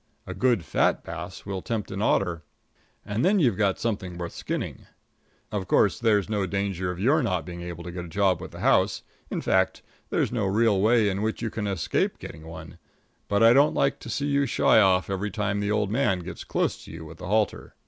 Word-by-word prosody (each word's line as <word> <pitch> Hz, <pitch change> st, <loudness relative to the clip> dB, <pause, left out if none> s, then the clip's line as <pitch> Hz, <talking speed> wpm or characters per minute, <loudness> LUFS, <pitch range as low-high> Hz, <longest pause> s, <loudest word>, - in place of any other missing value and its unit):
A 95 Hz, -, -6 dB
good 110 Hz, -2 st, +1 dB
fat -, -, +1 dB
bass 85 Hz, +2 st, -7 dB
will 100 Hz, -2 st, -4 dB
tempt 110 Hz, 0 st, -3 dB
an 95 Hz, +1 st, -4 dB
otter, 90 Hz, -6 st, +1 dB, 0.6 s
and 105 Hz, +2 st, -1 dB
then 195 Hz, +4 st, +4 dB
you've 125 Hz, -, +3 dB
got 100 Hz, -1 st, +1 dB
something 95 Hz, -6 st, -3 dB
worth 85 Hz, -1 st, -5 dB
skinning. -, -, -5 dB, 0.6 s
Of 100 Hz, -3 st, -3 dB
course, 100 Hz, -, +3 dB
there's 105 Hz, -4 st, +2 dB
no 105 Hz, -3 st, -1 dB
danger 95 Hz, -1 st, -2 dB
of 90 Hz, 0 st, -5 dB
your 140 Hz, +10 st, +3 dB
not 95 Hz, -, -1 dB
being 85 Hz, -1 st, -7 dB
able 85 Hz, -1 st, -7 dB
to 90 Hz, -, -6 dB
get 90 Hz, 0 st, -6 dB
a -, -, -9 dB
job 95 Hz, 0 st, +1 dB
with 95 Hz, -, -7 dB
the -, -, -10 dB
house -, -, +2 dB, 0.3 s
in -, -, -3 dB
fact, 95 Hz, 0 st, +1 dB, 0.3 s
there -, -, +1 dB
is -, -, -2 dB
no 110 Hz, -5 st, 0 dB
real 105 Hz, 0 st, +3 dB
way 110 Hz, 0 st, +4 dB
in 100 Hz, 0 st, -1 dB
which 110 Hz, +1 st, -2 dB
you 110 Hz, -, -2 dB
can 105 Hz, -2 st, -3 dB
escape 95 Hz, -5 st, 0 dB
getting 80 Hz, +1 st, -10 dB
one; 80 Hz, +1 st, -10 dB, 0.5 s
but 100 Hz, +2 st, +2 dB
I 115 Hz, +1 st, +8 dB
don't 140 Hz, +3 st, +4 dB
like 140 Hz, -, +1 dB
to 120 Hz, -, -9 dB
see 140 Hz, +5 st, -1 dB
you 140 Hz, -1 st, +1 dB
shy 115 Hz, -, +4 dB
off 95 Hz, -3 st, +4 dB
every 100 Hz, +2 st, -2 dB
time 105 Hz, 0 st, -1 dB
the 100 Hz, 0 st, -1 dB
old 105 Hz, -1 st, 0 dB
man 110 Hz, -7 st, +1 dB
gets 85 Hz, 0 st, -7 dB
close -, -, -1 dB
to -, -, -11 dB
you 80 Hz, 0 st, -8 dB
with 80 Hz, +1 st, -12 dB
the -, -, -7 dB
halter. 105 Hz, +1 st, 0 dB
100 Hz, 225 wpm, -26 LUFS, 90-110 Hz, 0.6 s, I